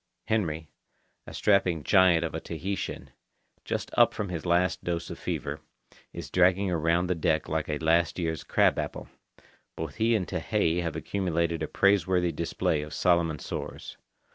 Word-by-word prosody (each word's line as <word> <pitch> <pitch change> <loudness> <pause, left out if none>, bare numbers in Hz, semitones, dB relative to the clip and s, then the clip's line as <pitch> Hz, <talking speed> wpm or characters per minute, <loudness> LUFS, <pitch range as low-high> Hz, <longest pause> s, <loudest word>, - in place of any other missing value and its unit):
Henry, 80 -8 -1 0.6
a - - -9
strapping 95 -6 +2
giant 90 -3 +4
of 80 - -5
a 80 - -2
Tahitian, 95 +5 -5 0.5
just - - -3
up - - +5
from 100 -2 -3
his 85 -1 -4
last 90 +1 +1
dose 85 -1 -3
of - - -8
fever, - - -4 0.5
is - - -8
dragging 95 +1 +3
around 85 +1 +1
the 90 - +1
deck 80 -2 0
like 80 -1 -2
a 75 - -1
last 80 +2 +2
year's 80 -3 -2
crab - - +2
apple. - - -5 0.7
Both 80 -3 -6
he 115 +1 +3
and 95 -6 -1
Tehei 85 +2 0
have 85 -2 -3
accumulated 85 -4 -1
a 80 - -1
praiseworthy 95 -3 +2
display 80 -1 -1
of 75 0 -7
Solomon 85 -3 +2
sores. - - -7
85 Hz, 160 wpm, -28 LUFS, 80-90 Hz, 0.7 s, up